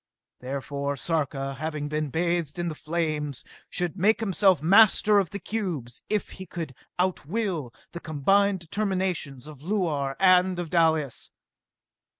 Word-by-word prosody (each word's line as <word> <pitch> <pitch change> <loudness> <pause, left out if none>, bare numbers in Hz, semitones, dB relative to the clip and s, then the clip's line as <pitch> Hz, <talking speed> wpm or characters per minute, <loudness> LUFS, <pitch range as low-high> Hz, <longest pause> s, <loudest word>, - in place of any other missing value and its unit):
Therefore, 140 +2 -3
Sarka, 135 -2 -1
having 155 -1 -3
been 150 0 -2
bathed 170 0 -1
in 175 0 -1
the - - -4
flames, 155 -3 -3 0.3
should 175 -1 -2
make 210 +5 +4
himself 195 -4 +3
master 205 +4 +5
of 190 - -1
the 200 - -5
cubes, 175 - -4
if 210 -1 -1
he 190 -1 -9
could 160 -4 -6 0.2
out 180 -5 0
will 180 - -2 0.2
the 170 - -6
combined 190 +6 +2
determinations 180 - -2
of 150 -3 -11
Luar 155 -7 -1
and 185 -1 +5
of 175 -3 -4
Dalis! 160 -6 +1
170 Hz, 140 wpm, -26 LUFS, 145-190 Hz, 0.3 s, master